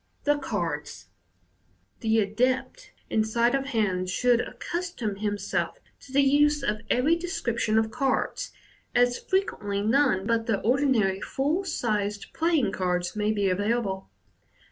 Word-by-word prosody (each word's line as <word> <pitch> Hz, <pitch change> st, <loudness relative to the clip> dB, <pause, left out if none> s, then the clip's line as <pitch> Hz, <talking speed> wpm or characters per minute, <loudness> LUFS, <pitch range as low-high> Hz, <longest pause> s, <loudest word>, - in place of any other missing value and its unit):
The 290 Hz, 0 st, +2 dB
Cards. 165 Hz, -, -4 dB, 0.5 s
— 95 Hz, +2 st, -41 dB
The 220 Hz, 0 st, +1 dB
adept 255 Hz, -, -1 dB, 0.2 s
in 220 Hz, -, +3 dB
sleight 235 Hz, +3 st, +2 dB
of 275 Hz, 0 st, 0 dB
hand 195 Hz, -7 st, 0 dB
should 245 Hz, +5 st, +3 dB
accustom 340 Hz, -, -4 dB
him 205 Hz, 0 st, -1 dB
self 200 Hz, -, -2 dB, 0.2 s
to 265 Hz, -, -15 dB
the 280 Hz, +1 st, +4 dB
use 295 Hz, +1 st, +3 dB
of 215 Hz, -5 st, -1 dB
every 280 Hz, +7 st, +3 dB
description 235 Hz, -, -1 dB
of 220 Hz, 0 st, +2 dB
cards, 275 Hz, -, -1 dB, 0.4 s
as 245 Hz, 0 st, +3 dB
frequently 205 Hz, -, -1 dB
none 225 Hz, -4 st, +2 dB
but 230 Hz, 0 st, 0 dB
the 215 Hz, -4 st, +1 dB
ordinary 230 Hz, -6 st, +2 dB
full 300 Hz, +8 st, -1 dB
sized 210 Hz, -, -2 dB
playing 320 Hz, -, +2 dB
cards 180 Hz, 0 st, -1 dB
may 210 Hz, 0 st, +1 dB
be 205 Hz, -2 st, +1 dB
available. 200 Hz, -, -1 dB
225 Hz, 140 wpm, -26 LUFS, 200-275 Hz, 0.5 s, the